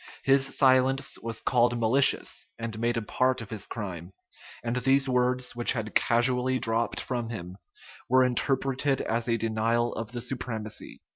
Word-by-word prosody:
His 135 0 +2
silence 135 0 +3
was 115 0 -5
called 120 -1 +2
malicious, 130 +5 +2
and 115 -1 -5
made 120 +1 0
a 115 - -2
part 130 +4 +1
of 115 -2 -9
his 105 -3 -3
crime; 95 -5 -6 0.5
and 120 +1 -2
these 135 +2 +2
words, 125 0 0
which 120 0 +2
had 110 -3 -4
casually 125 +2 +2
dropped 115 -1 0
from 120 -3 -3
him, 95 -4 -7 0.5
were 130 +1 +5
interpreted 135 +2 0
as 115 +1 -2
a 115 - +2
denial 115 +2 0
of 115 -1 -6
the 120 -1 -5
supremacy. 115 -4 -5
120 Hz, 155 wpm, -27 LUFS, 115-130 Hz, 0.5 s, were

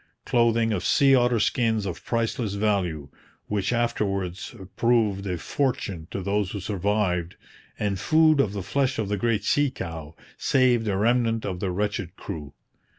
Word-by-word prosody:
Clothing 115 -1 +2
of 95 -2 -2
sea 140 -1 +4
otter 120 -2 +3
skins 110 -1 +1
of 90 - -5
priceless 115 -2 -1
value, 95 -9 -1 0.4
which 100 0 -1
afterwards 100 -6 -2 0.2
proved 110 -5 +2
a 90 -2 -2
fortune 95 - -2
to 95 - -4
those 100 0 0
who 100 - -5
survived, 95 -3 -1 0.4
and 100 -2 -1
food 155 - +4
of 105 -7 +2
the 100 -2 -4
flesh 135 +6 0
of 105 -3 -2
the 105 - 0
great 110 +1 0
sea 145 -1 +2
cow, 80 - -7 0.2
saved 125 -4 +3
a 100 -2 0
remnant 115 +1 +1
of 95 -3 -3
the 95 -1 -1
wretched 100 -1 -2
crew. 75 -3 -7
105 Hz, 155 wpm, -25 LUFS, 95-120 Hz, 0.4 s, sea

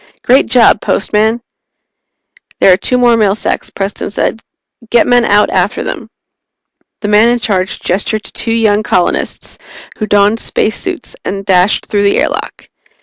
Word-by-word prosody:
"Great 260 +3 +3
job, 230 -3 +4
Postman!" 220 +4 0 1.2
"There 190 - +6
are - - +2
two 250 +5 -1
more 240 -1 +4
mail 205 -3 +2
sacks," - - -3
Preston 195 0 -4
said. 225 +2 -2 0.5
"Get 240 - +3
men 245 -1 +3
out 210 -2 +2
after - - 0
them." - - -6 0.9
The 205 - -3
man 210 +3 +4
in 240 - +2
charge 195 -5 -2
gestured 205 +3 -2
to - - -10
two 230 - -4
young 215 -2 +2
colonists, 180 -2 -2 0.4
who 215 - -2
donned 205 +2 +2
spacesuits 360 - -3
and 195 0 -5
dashed 185 0 +2
through 205 -2 -1
the 200 0 +2
airlock. - - -3
215 Hz, 150 wpm, -12 LUFS, 200-230 Hz, 1.2 s, There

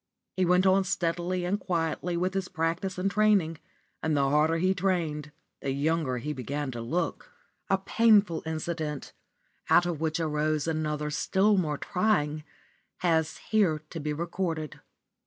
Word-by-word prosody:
He 185 - +2
went 180 +2 +4
on 190 +1 +5
steadily 175 0 -1
and 200 +3 0
quietly 170 -1 -1
with 185 +2 0
his 195 -1 -2
practice 170 +4 -2
and 190 +2 0
training, 200 -7 +2 0.4
and 155 -2 +1
the 140 -1 +3
harder 155 +2 +3
he 185 +3 +2
trained, 165 -6 -1 0.3
the 140 - -2
younger 145 -1 0
he 150 +5 -3
began 140 +2 -3
to 120 -1 -5
look. 170 - -2 0.4
A 195 - +4
painful 205 -3 +3
incident, 155 -2 -4 0.6
out 175 - +6
of 170 -3 -3
which 160 +1 0
arose 155 -1 0
another 150 -2 -1
still 200 +7 +2
more 155 -6 0
trying, 155 -7 0 0.6
has 160 -3 +1
here 180 -8 +2
to 165 - -5
be 150 0 -2
recorded. 165 -1 -3
165 Hz, 150 wpm, -28 LUFS, 150-185 Hz, 0.6 s, out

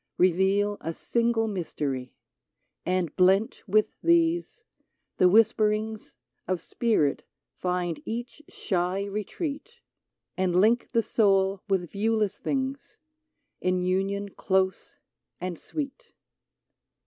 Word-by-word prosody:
Reveal 190 +3 +3
a 165 0 -4
single 235 -1 +1
mystery: 145 - -3 0.7
And 180 -3 0
blent 190 +4 +3
with 215 +2 +2
these, 340 +5 +2 0.5
the 180 - +5
whisperings 215 +1 +2 0.3
Of 185 -1 0
spirit 175 - 0 0.3
find 180 -2 -2
each 240 +5 -5
shy 185 0 -1
retreat, 245 - -4
82 460 - -25
UNITED 475 - -31 0.6
And 185 -2 +1
link 225 +5 +3
the 230 - +2
soul 195 -3 +2
with 180 -3 0
viewless 215 0 0
things, 270 0 -3 0.6
In 185 0 +1
union 195 +2 0
close 190 -1 -1 0.4
and 180 -2 -4
sweet. 285 -3 -6
200 Hz, 105 wpm, -27 LUFS, 185-225 Hz, 0.7 s, the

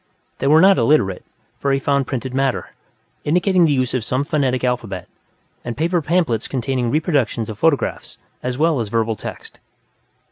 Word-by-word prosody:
They 135 - 0
were 155 +3 +6
not 195 -2 +6
illiterate; 115 -7 +2 0.4
he 140 -1 +2
found 140 0 0
printed 130 -1 -4
matter, 135 -1 -1 0.5
indicating 180 +3 +3
the 155 - +2
use 130 -3 0
of 130 -3 -1
some 130 +5 -1
phonetic 140 -5 0
alphabet, 115 -8 -2 0.6
and 120 -1 -5
paper 170 +2 +1
pamphlets 155 - 0
containing 130 -1 -1
printed 115 - -1
reproductions 120 - 0
of 105 - -10
photographs 160 -1 0 0.2
as 125 0 -3
well 155 -2 +2
as 110 -3 -3
verbal 115 0 0
text. - - -9
135 Hz, 165 wpm, -20 LUFS, 120-155 Hz, 0.6 s, were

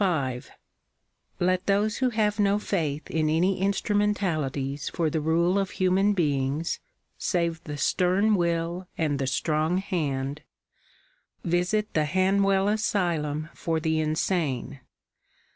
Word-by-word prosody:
M 135 -9 0 1.0
Let 185 +1 +1
those 205 +2 +2
who 260 -1 +2
have 215 -2 0
no 200 0 +3
faith 160 -8 -2
in 155 -1 +1
any 180 +4 +1
instrumentalities 180 -9 0
for 165 -3 -1
the 160 - -1
rule 170 +5 +2
of 195 -1 -1
human 190 +2 +3
beings, 145 -3 0 0.4
save 170 -3 -1
the 150 -1 -5
stern 185 +8 +2
will 170 0 -1
and 150 -4 0
the 135 - -1
strong 155 +6 0
hand, 145 -7 -2 0.5
) - - -38
visit 180 +5 0
the 155 -1 +2
Hanwell 195 +3 +2
Asylum 170 -8 0
for 165 -1 -2
the 160 0 0
insane. 155 -4 -1
170 Hz, 125 wpm, -26 LUFS, 155-195 Hz, 1.0 s, no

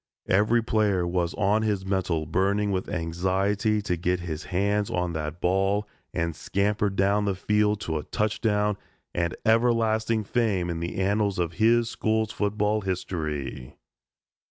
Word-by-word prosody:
Every 105 +4 +3
player 105 -5 +1
was 85 -1 -1
on 105 +1 +2
his 105 -3 -1
mettle 90 -5 0
burning 100 +5 +1
with 95 -1 -2
anxiety 95 +6 0
to 90 - 0
get 90 +1 -1
his 80 -1 -5
hands 100 +3 0
on 90 -1 -1
that 75 +1 -4
ball 95 +3 +1 0.2
and 85 -1 -2
scamper 100 +4 0
down 100 +1 +1
the 100 -2 0
field 105 +2 +1
to 80 -5 -2
a - - -6
touchdown 105 -1 0 0.4
and 85 0 -1
everlasting 115 -1 +2
fame 100 -6 0
in 85 - -3
the 85 +2 -4
annals 100 +1 +1
of 85 -1 -1
his 115 +1 +4
school's 110 0 0
football 105 +1 0
history. 75 -9 -4
100 Hz, 145 wpm, -26 LUFS, 90-105 Hz, 0.4 s, his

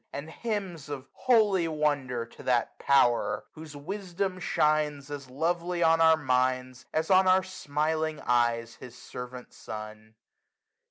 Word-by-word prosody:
And 150 +3 -6
hymns 190 -9 -4
of 140 -2 -6
holy 210 -8 +3
wonder, 145 -6 -1
to 115 - -15
that 120 -2 0
Power, 120 -6 +3
Whose 155 -2 -11
wisdom 185 +3 -4
shines 150 -4 +1
as 140 -3 -7
lovely 170 +5 -1
on 165 0 +4
our 160 0 +6
minds, 130 -2 0
340 - - -2
As 160 +4 -2
on 190 0 +6
our 185 0 +5
smiling 155 -3 -2
eyes 120 -1 +1
his 125 -2 -11
servant 125 0 -9
sun. 110 0 -9
150 Hz, 140 wpm, -28 LUFS, 125-170 Hz, -, our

